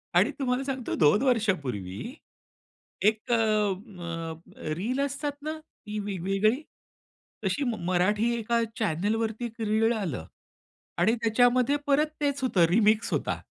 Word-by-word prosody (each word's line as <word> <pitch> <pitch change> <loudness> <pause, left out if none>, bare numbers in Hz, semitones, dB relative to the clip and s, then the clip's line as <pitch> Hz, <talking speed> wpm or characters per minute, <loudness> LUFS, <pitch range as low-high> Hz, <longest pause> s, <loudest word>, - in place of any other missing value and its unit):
आणि - - +5
तुम्हाला 255 -1 0
सांगतो 265 -3 -3
2 155 +6 +4
वर्षांपूर्वी, 185 - -1 0.9
एक 215 +4 +1
अ, - - +5
अ, 195 -6 -1 0.4
रील 240 +9 -1
असतात 280 +1 -3
ना 310 +1 -3
ती 215 -9 -8
वेगवेगळी, 200 - 0 0.8
तशी 290 - 0 0.2
मराठी 205 +6 +2
एका 230 +1 +1 0.2
चॅनेलवरती 220 +4 0
एक 230 0 -8
रीळ 220 +2 +2
आलं 170 - -3 0.8
आणि 210 +6 +4
त्याच्यामध्ये 245 +4 +4
परत 290 +2 +4
तेच 280 -1 0
होतं 190 -9 +4
रिमिक्स 215 +3 +3
होता. - - -1
220 Hz, 120 wpm, -27 LUFS, 195-245 Hz, 0.9 s, आणि